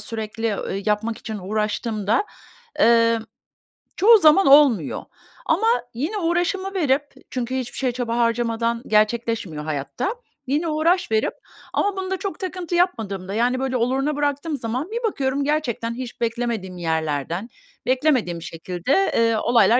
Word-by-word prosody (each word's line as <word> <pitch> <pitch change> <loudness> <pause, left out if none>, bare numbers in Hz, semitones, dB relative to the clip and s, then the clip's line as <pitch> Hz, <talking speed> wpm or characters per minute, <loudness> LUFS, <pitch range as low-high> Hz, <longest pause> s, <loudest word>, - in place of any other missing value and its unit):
sürekli, 225 -1 -3
ööö, 195 0 -4
yapmak 215 +2 0
için 215 -2 -6
uğraştığımda, 215 - -1 0.5
emm, 230 0 +4 0.7
çoğu 445 +4 +7
zaman 330 +2 +5
olmuyor. 270 - +5 0.4
Ama 400 +8 +2 0.3
yine 310 - -2
uğraşımı 360 +2 0
verip 290 -6 +2 0.3
çünkü 255 0 -3
hiçbir 255 -2 -4
şeye 260 -2 0
çaba 240 -1 -2
harcamadan 230 0 0
gerçekleşmiyor 215 -7 +1
hayatta. 155 - -3 0.3
Yine 300 +6 0
uğraş 330 +1 +1
verip 220 0 +1 0.4
ama 405 -1 0
bunda 380 0 -2
çok 395 0 -5
takıntı 365 -2 -4
yapmadığımda, 200 - 0
yani, 245 +4 +1
böyle, 265 -1 -1
oluruna 270 +5 0
bıraktığım 290 +1 -1
zaman, 250 - -3
bir 470 +2 -3
bakıyorum 275 -1 -1
gerçekten 255 -6 -1
hiç 245 -1 -7
beklemediğim 230 -5 -2
yerlerden, 160 - -2 0.4
beklemediğim 255 - +1
şekilde, 180 - -1
eee, 230 -1 +3
olaylar 235 0 +4
240 Hz, 130 wpm, -22 LUFS, 220-300 Hz, 0.7 s, çoğu